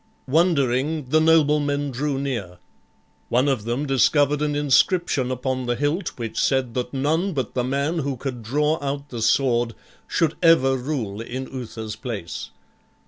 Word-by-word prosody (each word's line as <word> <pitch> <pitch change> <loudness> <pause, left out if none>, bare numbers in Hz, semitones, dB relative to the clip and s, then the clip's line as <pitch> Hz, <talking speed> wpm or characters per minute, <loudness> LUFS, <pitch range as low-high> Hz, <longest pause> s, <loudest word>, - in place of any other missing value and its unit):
Wondering, 145 -2 +1
the 155 +3 +4
noblemen 145 -3 +3
drew 140 +2 -2
near. 120 -10 -4 0.7
One 125 +4 +2
of 130 -7 0
them 120 +5 -1
discovered 145 +2 +3
an 150 -1 0
inscription 145 -1 +2
upon 130 0 -2
the 120 - +1
hilt 150 - -2
which 115 -3 -4
said 130 -3 +1
that 125 0 -3
none 160 +8 0
but 130 -6 -3
the 125 - 0
man 140 +6 -1
who 140 -3 -2
could 125 -2 -5
draw 150 +7 0
out 140 +1 -4
the 120 -4 -5
sword 120 0 +2 0.3
should 165 -3 +1
ever 150 -6 +5
rule 125 -6 -3
in 130 +3 -5
Uther's 110 -4 -6
place. 110 -6 -6
135 Hz, 150 wpm, -23 LUFS, 125-150 Hz, 0.7 s, ever